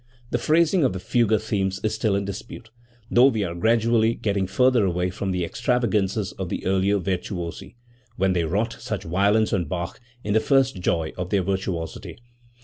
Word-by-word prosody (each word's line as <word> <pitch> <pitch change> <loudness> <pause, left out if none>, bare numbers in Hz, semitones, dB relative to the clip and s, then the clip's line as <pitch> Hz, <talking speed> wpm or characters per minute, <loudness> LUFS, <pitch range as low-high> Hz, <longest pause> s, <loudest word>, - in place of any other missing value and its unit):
The 120 - 0
phrasing 165 +5 +3
of 130 - +2
the 95 - -4
fugue 110 +1 +2
themes 95 -3 -2
is 110 0 0
still 110 -2 0
in 100 0 -1
dispute, 110 +3 -8 0.4
though 125 +2 +6
we 110 -6 0
are 85 -3 -3
gradually 115 +4 +2
getting 100 -3 -1
further 125 +3 +3
away 90 -1 0
from 95 +2 -4
the 90 -2 -1
extravagances 110 -3 0
of 95 -2 -3
the - - -4
earlier 95 +2 +2
virtuosi, 90 -1 -4 0.4
when 95 0 +1
they 85 -2 0
wrought 105 +8 -1
such - - -4
violence 100 +6 +2
on 90 -4 +1
Bach 85 - -5 0.2
in 105 - -1
the 110 - +5
first 135 -3 +2
joy 85 -3 -1
of 90 0 -3
their 100 -2 +1
virtuosity. 95 -3 -4
100 Hz, 180 wpm, -24 LUFS, 90-115 Hz, 0.4 s, though